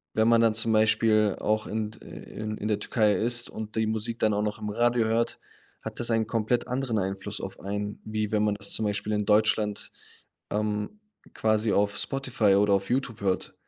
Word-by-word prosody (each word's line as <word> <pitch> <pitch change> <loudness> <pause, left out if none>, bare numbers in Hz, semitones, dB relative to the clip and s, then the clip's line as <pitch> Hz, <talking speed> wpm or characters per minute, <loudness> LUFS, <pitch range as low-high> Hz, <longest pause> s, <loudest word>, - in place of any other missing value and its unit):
Wenn 110 0 +3
man 115 0 +5
dann 115 -1 +4
zum 110 +1 +1
Beispiel 110 -1 +3
auch 110 0 0
in 110 0 -3
d 110 - -15
ãh, - - -16 0.2
in 110 0 -6
in 105 - -4
der 105 -1 0
Türkei 105 0 +2
ist 120 +4 +3
und 110 0 -7
die 110 0 +1
Musik 110 +1 -3
dann 110 - +2
auch 105 - 0
noch 105 -1 -2
im 105 - -4
Radio 120 +1 +2
hört, 115 +1 0 0.4
hat - - -7
das 120 0 +1
einen 115 -1 +1
komplett 115 +1 0
anderen 125 -3 -1
Einfluss 95 +2 -3
auf 95 - -7
einen, 105 +1 -4
wie 110 -1 -3
wenn 105 -1 +2
man 105 -1 +1
das 100 0 -4
zum 110 - 0
Beispiel 105 +1 -1
in 105 -1 0
Deutschland, 105 -1 +2 0.6
ähm, 105 - -2 0.3
quasi 110 0 +1
auf 100 0 +1
Spotify 130 -7 +1
oder 100 0 +3
auf 100 0 0
Youtube 125 -4 -1
hört. 95 -2 -1
110 Hz, 205 wpm, -27 LUFS, 105-115 Hz, 0.6 s, man